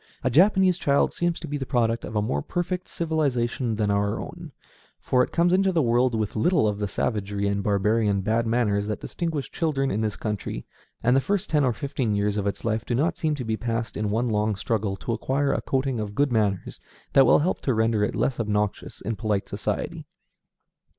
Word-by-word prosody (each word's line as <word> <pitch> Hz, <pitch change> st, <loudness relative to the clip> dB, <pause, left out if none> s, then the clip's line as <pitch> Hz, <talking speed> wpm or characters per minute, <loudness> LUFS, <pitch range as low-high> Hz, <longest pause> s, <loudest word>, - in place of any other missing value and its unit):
A 130 Hz, -, +1 dB
Japanese 185 Hz, -, +4 dB
child 140 Hz, 0 st, +2 dB
seems 175 Hz, -1 st, -1 dB
to 165 Hz, -, -6 dB
be 145 Hz, 0 st, -3 dB
the 135 Hz, -, -3 dB
product 115 Hz, -1 st, +1 dB
of 110 Hz, -, -7 dB
a 105 Hz, -, +2 dB
more 75 Hz, -9 st, -1 dB
perfect 180 Hz, -, -3 dB
civilization 130 Hz, -7 st, -1 dB
than 105 Hz, -1 st, 0 dB
our 100 Hz, +2 st, 0 dB
own, 170 Hz, -2 st, -8 dB, 0.5 s
for 125 Hz, -, +2 dB
it -, -, -4 dB
comes 175 Hz, +1 st, +3 dB
into 190 Hz, +1 st, +3 dB
the 165 Hz, -4 st, +2 dB
world 120 Hz, 0 st, +2 dB
with 110 Hz, -2 st, -2 dB
little 150 Hz, +2 st, +3 dB
of 105 Hz, -1 st, -1 dB
the 105 Hz, -, -1 dB
savagery 100 Hz, -1 st, -1 dB
and 100 Hz, 0 st, 0 dB
barbarian 105 Hz, 0 st, +1 dB
bad 115 Hz, +4 st, 0 dB
manners 105 Hz, -3 st, +1 dB
that 105 Hz, -1 st, -3 dB
distinguish 165 Hz, -5 st, -4 dB
children 140 Hz, -5 st, 0 dB
in 105 Hz, -, -1 dB
this 110 Hz, -2 st, -1 dB
country, 105 Hz, -, -4 dB, 0.4 s
and 125 Hz, +2 st, +4 dB
the 135 Hz, -, +4 dB
first 200 Hz, +3 st, -1 dB
ten 150 Hz, -2 st, +3 dB
or 130 Hz, -, +3 dB
fifteen 125 Hz, -4 st, -2 dB
years 100 Hz, 0 st, 0 dB
of 100 Hz, -1 st, -1 dB
its 100 Hz, -, -3 dB
life 110 Hz, 0 st, 0 dB
do 120 Hz, -, -2 dB
not 150 Hz, +7 st, +1 dB
seem 155 Hz, -2 st, 0 dB
to 130 Hz, -4 st, -5 dB
be 110 Hz, 0 st, 0 dB
passed 115 Hz, -1 st, -3 dB
in 105 Hz, 0 st, -1 dB
one 115 Hz, +4 st, 0 dB
long 105 Hz, -1 st, +1 dB
struggle 105 Hz, -1 st, -1 dB
to 115 Hz, +4 st, -3 dB
acquire 135 Hz, +4 st, 0 dB
a -, -, -1 dB
coating 130 Hz, -2 st, -1 dB
of 105 Hz, -1 st, -4 dB
good 140 Hz, +1 st, +2 dB
manners 105 Hz, -5 st, 0 dB, 0.3 s
that 135 Hz, -, +6 dB
will -, -, +7 dB
help 170 Hz, +5 st, 0 dB
to 135 Hz, -, 0 dB
render 110 Hz, -2 st, +2 dB
it 105 Hz, -, -1 dB
less 130 Hz, -, 0 dB
obnoxious 105 Hz, -2 st, -2 dB
in 115 Hz, -, -3 dB
polite 105 Hz, -3 st, -1 dB
society. -, -, -3 dB
115 Hz, 215 wpm, -25 LUFS, 105-140 Hz, 0.5 s, will